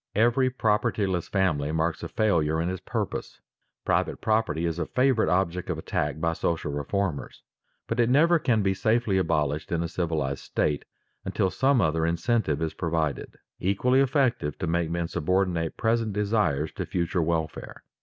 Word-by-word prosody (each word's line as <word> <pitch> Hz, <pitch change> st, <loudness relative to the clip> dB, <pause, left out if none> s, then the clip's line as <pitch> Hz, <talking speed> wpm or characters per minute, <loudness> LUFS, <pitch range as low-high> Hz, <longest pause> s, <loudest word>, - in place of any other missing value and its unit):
Every 120 Hz, +4 st, +3 dB
propertyless 105 Hz, -6 st, 0 dB
family 80 Hz, -7 st, +1 dB
marks 80 Hz, +1 st, -1 dB
a -, -, -4 dB
failure 80 Hz, -7 st, +1 dB
in 85 Hz, +2 st, 0 dB
its 95 Hz, -, -5 dB
purpose. -, -, -4 dB, 0.5 s
Private -, -, 0 dB
property 110 Hz, -7 st, 0 dB
is 85 Hz, 0 st, -2 dB
a -, -, -2 dB
favorite 130 Hz, -3 st, +2 dB
object 90 Hz, -1 st, 0 dB
of -, -, -1 dB
attack 75 Hz, +1 st, -2 dB
by 85 Hz, +1 st, 0 dB
social 80 Hz, -2 st, -2 dB
reformers, 75 Hz, +3 st, -3 dB, 0.4 s
but 115 Hz, -, -3 dB
it 120 Hz, 0 st, +3 dB
never 165 Hz, +6 st, +5 dB
can 115 Hz, -7 st, +1 dB
be 95 Hz, 0 st, +2 dB
safely 110 Hz, 0 st, +1 dB
abolished 75 Hz, -4 st, -1 dB
in 85 Hz, -1 st, 0 dB
a -, -, -2 dB
civilized 80 Hz, -6 st, -2 dB
state 75 Hz, -1 st, -1 dB, 0.4 s
until 95 Hz, -, 0 dB
some 135 Hz, -2 st, +3 dB
other 80 Hz, -2 st, +1 dB
incentive 85 Hz, -, 0 dB
is 80 Hz, -, -2 dB
provided, 80 Hz, -4 st, -2 dB, 0.2 s
equally 125 Hz, +8 st, +2 dB
effective 130 Hz, -, +1 dB
to 95 Hz, -, -3 dB
make 85 Hz, -1 st, 0 dB
men 85 Hz, 0 st, -1 dB
subordinate 85 Hz, 0 st, 0 dB
present 115 Hz, -2 st, +1 dB
desires 100 Hz, -8 st, 0 dB
to -, -, -5 dB
future 85 Hz, 0 st, -1 dB
welfare. 80 Hz, -1 st, -3 dB
90 Hz, 160 wpm, -26 LUFS, 80-110 Hz, 0.5 s, never